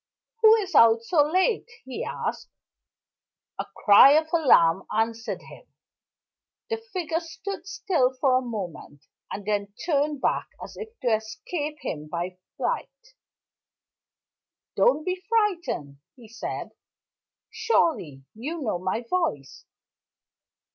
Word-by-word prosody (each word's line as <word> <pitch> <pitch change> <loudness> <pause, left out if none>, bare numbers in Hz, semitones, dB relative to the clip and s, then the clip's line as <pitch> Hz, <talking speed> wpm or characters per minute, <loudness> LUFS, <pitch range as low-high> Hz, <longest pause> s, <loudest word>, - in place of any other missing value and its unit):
"Who 440 0 +8
is 390 -5 -3
out 230 -3 +6
so 300 +6 +3
late?" 375 +10 +1 0.2
he 260 - -5
asked. - - -4 1.1
A - - -3 0.2
cry 210 +7 +9
of 315 +1 +2
alarm 195 - +4
answered 225 +1 -2
him. - - -14 1.1
The 450 - +1
figure 365 -8 -3
stood 355 +2 -7
still 335 -10 +1
for 260 0 +2
a 255 - +3
moment, 195 - -7 0.3
and 200 - -6
then 205 -1 -2
turned 295 -3 +1
back - - 0
as - - -9
if 445 0 -7
to 245 -4 +2
escape 290 +8 -3
him 150 0 -5
by 175 +3 -4 0.2
flight. - - -4 1.6
"Don't 485 -11 +3
be 365 0 -2
frightened," 355 - 0 0.2
he 240 -4 -15
said. 230 +2 -6 0.8
"Surely 180 - 0
you 295 +10 -5
know 215 -9 -1
my 185 +6 -2
voice?" 325 - -2
270 Hz, 120 wpm, -25 LUFS, -, 1.6 s, cry